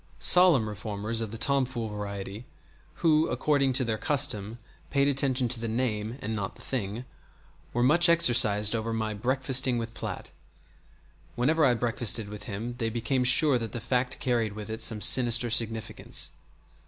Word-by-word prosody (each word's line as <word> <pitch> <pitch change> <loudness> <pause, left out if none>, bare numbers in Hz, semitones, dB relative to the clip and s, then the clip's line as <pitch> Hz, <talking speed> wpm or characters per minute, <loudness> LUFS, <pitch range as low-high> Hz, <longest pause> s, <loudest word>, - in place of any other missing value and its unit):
Solemn 175 -11 +6
reformers 105 +2 -3
of 110 - -4
the 115 - -8
tom 140 +4 +1
fool 120 -3 -4
variety, 105 +2 -7 0.6
who, 155 -1 +3
according 140 -3 0
to 130 0 +2
their 110 -2 -3
custom, 120 -8 0 0.3
paid 140 -1 +1
attention 135 -2 0
to 120 -1 0
the 115 - -4
name 110 -1 -3
and 110 +2 -4
not 100 -3 -5
the - - -16
thing, 115 -1 -4 0.7
were 120 - -1
much 170 +7 +4
exercised 110 -10 +4
over 115 0 -3
my 110 -1 -3
"breakfasting 130 +3 +1
with 115 -1 -5
Platt." - - -7 1.0
Whenever 155 +6 +1
I 125 -4 +3
breakfasted 115 -2 -1
with 105 -1 -10
him 110 +4 -6
they 115 -2 -1
became 120 +3 -2
sure 130 +1 +3
that 115 -1 -7
the 120 - -4
fact 125 +2 -2
carried 115 -4 -1
with 105 +1 -8
it 110 +1 -6
some 110 -1 0
sinister 120 -1 +4
significance. 115 -2 -1
115 Hz, 165 wpm, -27 LUFS, 110-130 Hz, 1.0 s, Solemn